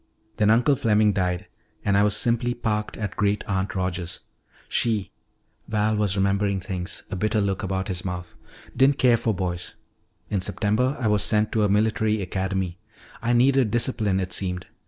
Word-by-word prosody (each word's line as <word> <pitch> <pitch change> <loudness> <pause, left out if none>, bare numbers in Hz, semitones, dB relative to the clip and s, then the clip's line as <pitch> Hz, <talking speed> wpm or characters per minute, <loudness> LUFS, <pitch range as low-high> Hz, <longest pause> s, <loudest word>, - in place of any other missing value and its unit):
"Then 105 -2 +3
Uncle 120 +6 +4
Fleming 105 -3 +3
died 90 -2 -1 0.4
and 100 - +2
I 100 - +5
was 105 0 +3
simply 120 +1 +1
parked 105 -2 -2
at 105 -4 -4
Great 105 0 +1
aunt 95 0 -2
Rogers'. 90 -2 -3 0.5
She" 110 -4 0 0.6
Val 110 0 +1
was 105 -2 +1
remembering 100 0 +1
things, 90 0 -5
a - - -2
bitter 105 +4 0
look 100 -2 0
about 95 -1 -2
his 90 -2 -3
mouth 90 -2 -5 0.4
"didn't 135 +1 +4
care 125 -2 +5
for 115 0 0
boys. 90 -3 -4 0.6
In 100 - 0
September 115 +8 0
I 120 - 0
was 105 -1 +3
sent 105 0 +2
to 110 - +1
a 105 - +3
military 110 +1 +2
academy. 95 -2 -2 0.4
I 120 +2 +1
needed 130 0 +4
discipline, 110 -4 +1
it 90 -1 -3
seemed. 90 -2 -3
105 Hz, 170 wpm, -24 LUFS, 95-110 Hz, 0.6 s, I